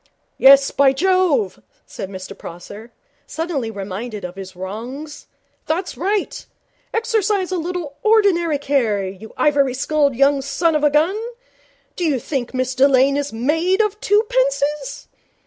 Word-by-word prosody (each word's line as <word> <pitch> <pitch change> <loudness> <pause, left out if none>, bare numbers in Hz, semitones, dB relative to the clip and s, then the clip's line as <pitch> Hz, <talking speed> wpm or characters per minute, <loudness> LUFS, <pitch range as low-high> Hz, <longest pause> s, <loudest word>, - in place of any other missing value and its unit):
'Yes, 275 +1 +7
by 275 -1 +4
Jove,' 330 - +1 0.2
said 190 - -7
Mr 190 0 -8
Prosser, 200 +7 -10 0.4
suddenly 320 -8 -3
reminded 205 +1 -6
of 180 - -7
his 190 -1 -9
wrongs, 235 +11 -7 0.4
'that's 355 +4 -2
right. 400 +3 -2 0.5
Exercise 430 -5 0
a 370 - 0
little 335 -4 -5
ordinary 390 -8 +3
care, 240 -9 0
you 195 +4 -10
ivory 280 -4 +2
skulled 285 0 +1
young 275 +2 +3
son 320 +5 0
of 300 -1 0
a 295 - +5
gun. 325 +9 +1 0.7
Do 355 - -3
you 295 -6 +1
think 250 0 -3
Miss 255 0 -1
Delane 270 +1 +4
is 285 0 -2
made 320 - 0
of 425 -1 0
twopences? 460 -4 0
285 Hz, 135 wpm, -20 LUFS, 240-360 Hz, 0.7 s, Yes